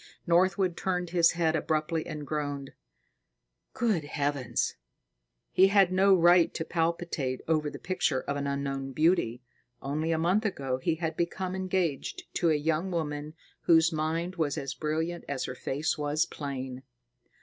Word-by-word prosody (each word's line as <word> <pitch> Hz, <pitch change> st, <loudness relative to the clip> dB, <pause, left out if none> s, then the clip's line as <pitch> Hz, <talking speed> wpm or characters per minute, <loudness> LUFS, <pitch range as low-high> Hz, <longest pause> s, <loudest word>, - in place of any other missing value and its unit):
Northwood 180 Hz, +1 st, +3 dB
turned 180 Hz, -2 st, -2 dB
his 170 Hz, -2 st, +4 dB
head 165 Hz, -2 st, +1 dB
abruptly 155 Hz, +1 st, -1 dB
and 150 Hz, -1 st, -6 dB
groaned, 145 Hz, -2 st, -3 dB, 1.0 s
"Good 215 Hz, -10 st, +1 dB
Heavens!" 145 Hz, -3 st, -1 dB, 0.8 s
He 190 Hz, -, +6 dB
had 195 Hz, -2 st, +4 dB
no 195 Hz, +1 st, +5 dB
right 175 Hz, 0 st, +5 dB
to 160 Hz, -, -2 dB
palpitate 165 Hz, -6 st, -1 dB
over 155 Hz, -2 st, +1 dB
the -, -, -8 dB
picture 165 Hz, -7 st, 0 dB
of 140 Hz, -, -3 dB
an 140 Hz, 0 st, -2 dB
unknown 135 Hz, -1 st, -3 dB
beauty. 155 Hz, -6 st, +2 dB, 0.4 s
Only 155 Hz, +4 st, -2 dB
a 165 Hz, -, +2 dB
month 180 Hz, +7 st, +2 dB
ago, 135 Hz, -11 st, -2 dB
he 160 Hz, +5 st, 0 dB
had 160 Hz, -1 st, -3 dB
become 180 Hz, +2 st, -2 dB
engaged 190 Hz, -, -1 dB
to 170 Hz, -, +2 dB
a 155 Hz, -, +4 dB
young 160 Hz, +4 st, 0 dB
woman 155 Hz, -3 st, -3 dB, 0.3 s
whose 160 Hz, 0 st, +5 dB
mind 165 Hz, +4 st, -2 dB
was 150 Hz, -4 st, 0 dB
as 135 Hz, -1 st, -3 dB
brilliant 160 Hz, +4 st, -2 dB
as 140 Hz, -2 st, -2 dB
her -, -, -4 dB
face 140 Hz, +4 st, -2 dB
was 150 Hz, +2 st, +1 dB
plain. 130 Hz, -3 st, -6 dB
160 Hz, 150 wpm, -29 LUFS, 145-175 Hz, 1.0 s, He